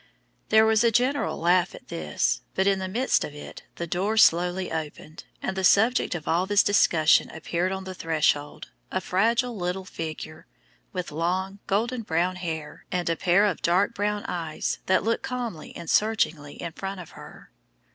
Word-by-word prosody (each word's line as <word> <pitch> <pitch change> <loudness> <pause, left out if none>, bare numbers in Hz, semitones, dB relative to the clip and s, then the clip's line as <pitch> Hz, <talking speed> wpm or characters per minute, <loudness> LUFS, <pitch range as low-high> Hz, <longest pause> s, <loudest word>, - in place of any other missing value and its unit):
There 220 0 +6
was 220 +1 +3
a 235 - +5
general 255 +5 +1
laugh 175 +2 +2
at - - -15
this, 75 -6 -1
but 190 - +2
in 195 -1 +3
the 190 - -3
midst 240 +8 +1
of 145 - -7
it 145 - -9
the 170 - -4
door 195 +6 -1
slowly 180 -1 +3
opened, 155 -1 -6 0.2
and 190 - -2
the 190 - -2
subject 220 +2 +4
of 160 - -6
all 175 +3 +1
this 205 0 +4
discussion 165 -6 +4
appeared 170 +3 -2
on 190 0 -4
the 190 0 -6
threshold, 155 -4 -1 0.2
a 185 - 0
fragile 230 +7 +1
little 180 0 -3
figure, 160 -4 -7 0.4
with 180 -3 -4
long, 185 +5 -2
golden 230 +5 0
brown 180 -1 0
hair, 160 -4 -5
and 175 -2 0
a - - +1
pair 185 +5 +3
of 200 -4 -1
dark 180 +4 +2
brown 205 0 -1
eyes 165 -3 -3
that 185 - +3
looked 230 +2 0
calmly 240 -11 -5
and 170 - -8
searchingly 165 -9 0
in 170 - -5
front 195 +3 -6
of 175 - -10
her. - - -13
185 Hz, 175 wpm, -26 LUFS, 165-205 Hz, 0.4 s, There